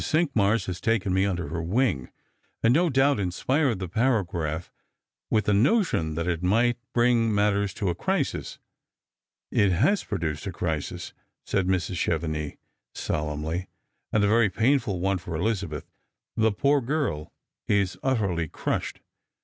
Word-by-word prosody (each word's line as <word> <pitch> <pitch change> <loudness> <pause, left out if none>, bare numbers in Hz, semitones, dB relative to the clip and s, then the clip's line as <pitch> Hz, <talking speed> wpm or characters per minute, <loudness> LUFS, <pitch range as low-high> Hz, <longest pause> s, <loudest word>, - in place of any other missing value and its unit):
Cinqmars 115 -10 +2
has 90 -1 -5
taken 110 -5 +1
me 95 +1 +3
under 90 -5 -2
her 85 +2 -3
wing, 90 - 0 0.5
and 115 +1 +5
no 170 +4 +3
doubt 135 -2 +3
inspired 120 - +1
the 95 -1 -4
paragraph, 90 - -1 0.6
with 110 -2 +2
the 105 - +3
notion 110 - +2
that 85 +1 -2
it 85 -2 -1
might 115 +6 +2
bring 120 -2 +3
matters 100 -1 +2
to 100 - -2
a - - +1
crisis." 90 - -2 0.5
" - - -66
It 100 -2 +3
has 135 - +2
produced 80 -4 -3
a - - -2
crisis," 80 -3 -3 0.3
said 95 -2 0
Mrs. 95 0 0
Chevenix, 80 -3 -2 0.4
solemnly, 75 +4 -2 0.2
" - - -52
and 105 - +2
a - - +4
very 110 0 +4
painful 115 -1 +1
one 95 +1 0
for 85 -1 -5
EHzabeth. 90 -5 -2 0.5
Ttie 110 -2 +2
poor 140 0 +3
girl 125 - -2 0.4
is 100 -2 +1
utterly 100 -11 0
crushed." - - -3
100 Hz, 150 wpm, -26 LUFS, 85-115 Hz, 0.6 s, and